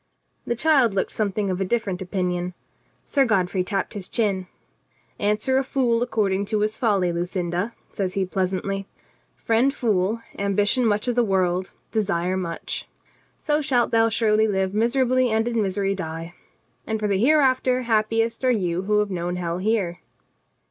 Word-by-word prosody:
The 235 - 0
child 265 -6 +3
looked 190 - 0
something 205 -2 -1
of 185 +1 -2
a - - +3
different 200 -2 -1
opinion. 180 -1 -2 0.5
Sir 275 - +2
Godfrey 190 -5 +1
tapped 195 +1 -2
his 200 -3 -5
chin. 195 -5 0 0.7
"Answer 215 +6 +1
a - - 0
fool 250 -4 +1
ac 245 - 0
cording 200 -3 +1
to 210 +1 -1
his 215 +1 0
folly, 200 -7 +2
Lucinda," 175 +4 -2 0.2
says 190 -3 -3
he 195 -1 +1
pleasantly. 190 +1 -2 0.5
"Friend 230 +4 +2
fool, 220 -3 0 0.2
ambition 205 +5 +2
much 210 +3 0
of 245 - +2
the 240 0 +3
world, 185 -3 +1 0.2
desire 185 -4 0
much. 170 -3 -4 0.5
So 300 -1 0
shalt 255 -5 +1
thou 225 0 +4
surely 220 -1 +2
live 190 -2 0
miserably 255 +3 +2
and 220 +1 +1
in 235 -2 0
misery 195 0 0
die. 165 -2 -6 0.5
And 220 0 -1
for 210 - 0
the 195 -2 +1
hereafter, 255 -1 +3
happiest 225 +1 0
are 255 - +3
you 180 -7 0
who 210 +2 +1
have 205 -1 -2
known 175 0 -2
hell 175 -1 -3
here." 190 -4 0
205 Hz, 160 wpm, -23 LUFS, 185-230 Hz, 0.7 s, thou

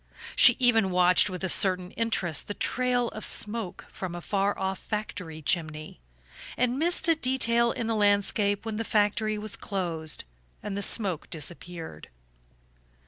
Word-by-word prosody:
She 245 - +7
even 225 -6 +3
watched 180 +2 +4
with 185 0 -6
a - - 0
certain 185 0 +3
interest 200 -8 -1
the 205 - -5
trail 250 -1 0
of 215 - -8
smoke 210 -3 -1
from 180 -2 -6
a - - -5
far 200 +2 -1
off 190 0 -3
factory 180 -7 -6
chimney, 155 - -2 0.6
and 250 +1 0
missed 345 +3 +1
a 330 - +6
detail 235 -5 +2
in 230 - -4
the 225 - -1
landscape 205 0 +1
when 220 -1 -4
the 225 - -2
factory 215 0 +1
was 215 +1 -3
closed 170 -7 -3 0.4
and 205 -2 -4
the 200 - -3
smoke 195 -6 0
disappeared. 165 - -6
205 Hz, 150 wpm, -27 LUFS, 180-230 Hz, 0.6 s, She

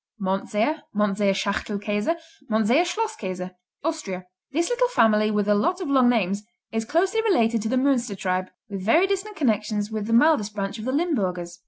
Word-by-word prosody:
Mondseer, 210 +9 -1
Mondseer 205 -1 +2
Schachtelkäse, 210 - -1 0.3
Mondseer 225 +9 +3
Schlosskäse 210 - -3 0.3
Austria 240 - -3 0.3
This 335 +5 +1
little - - +2
family 215 - +3
with 210 -1 0
a 210 - +4
lot 220 - +1
of 355 -6 -4
long 260 -3 +5
names 200 -4 +1 0.3
is 225 0 -2
closely 375 - +1
related 235 - +2
to 220 - -2
the 260 - +1
Münster 255 -6 +1
tribe, 185 0 -1 0.2
with 195 -2 -6
very 315 - +4
distant 400 +2 -2
connections 215 - 0
with 215 -1 -3
the 230 - 0
mildest 230 -5 +3
branch 200 +1 -3
of 215 - -6
the 260 - -1
Limburgers. 185 - -1
220 Hz, 170 wpm, -24 LUFS, 200-310 Hz, 0.3 s, long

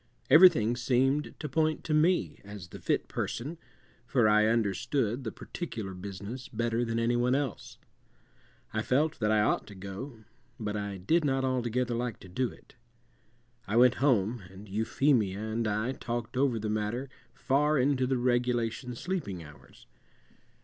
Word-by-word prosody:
Everything 155 - +7
seemed 135 +4 +1
to 150 - -4
point 155 +3 0
to 155 - -2
me 165 +4 +2
as 100 -4 -9
the - - -10
fit - - 0
person, 150 +8 -4 0.5
for 120 -5 +3
I 105 0 +5
understood 115 +3 0
the 110 - -3
particular 110 - -6
business 100 +6 -7
better 115 0 -1
than 115 -1 -2
any 115 +1 +1
one 125 +2 +2
else. 140 -5 -3 1.0
I 110 - 0
felt 145 +6 +1
that 105 -2 +1
I 110 -1 +4
ought 105 - +1
to 105 - -11
go, 100 +6 -8 0.4
but 105 -2 -3
I 100 -1 -3
did 160 - +2
not 135 -2 +1
altogether 125 -1 0
like 120 -1 -3
to - - -11
do 125 +7 -1
it. - - -17 0.9
I 105 - -2
went 125 +1 +6
home, 120 -4 +2
and 95 +3 -12
Euphemia 110 0 +1
and 110 +2 -2
I 110 +4 0
talked 120 -2 -4
over 130 -2 +2
the 110 0 -3
matter 110 +5 -2 0.3
far 145 +3 +2
into 130 -1 +2
the 130 0 +1
regulation 120 0 0
sleeping 115 - -4
hours. 75 -1 -16
120 Hz, 155 wpm, -29 LUFS, 105-135 Hz, 1.0 s, Everything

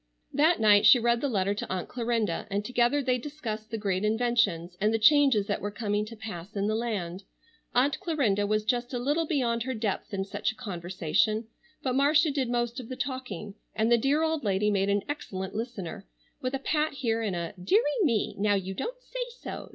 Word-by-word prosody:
That 315 +5 +4
night 205 -2 +6
she - - +9
read 235 0 +2
the 285 - 0
letter 200 -3 +1
to 205 - -5
Aunt 185 -2 -2
Clarinda 235 -3 -1
and 200 +1 -2
together 250 +4 +2
they 250 -1 +1
discussed 230 -6 -6
the 225 - -3
great 195 -2 -1
inventions, 215 -6 +1
and 210 +1 +3
the 225 - +2
changes 270 -3 +5
that - - -2
were 205 - -2
coming 210 0 -2
to 230 - -9
pass 200 -3 -8
in 200 0 0
the 215 - +1
land. 200 -6 -2 0.5
Aunt 265 +4 +3
Clarinda 265 - +1
was 215 0 0
just 245 +2 -1
a - - 0
little 295 +6 0
beyond 240 -7 0
her 260 +2 -2
depth 215 -3 -2
in 195 -1 -2
such 205 +2 -2
a - - -15
conversation, 195 +1 -1 0.3
but 255 - 0
Marcia 295 +3 +4
did 270 -4 -1
most 240 +1 -1
of 245 - -9
the 255 - -4
talking, 255 -6 -5 0.2
and 225 +2 +1
the - - +8
dear 285 +6 +2
old 320 -2 0
lady 205 0 +1
made 195 0 +1
an 200 0 +1
excellent 190 -10 -5
listener, 215 - -5 0.3
with 255 +1 -1
a - - +1
pat 305 +3 0
here, 230 -5 -1
and 205 -5 -1
a 170 -1 -4
"Dearie 345 - +2
me! 235 - +1
Now 205 0 +3
you 190 -1 -2
don't - - -4
say - - -4
so!" - - -7
225 Hz, 210 wpm, -28 LUFS, 205-260 Hz, 0.5 s, she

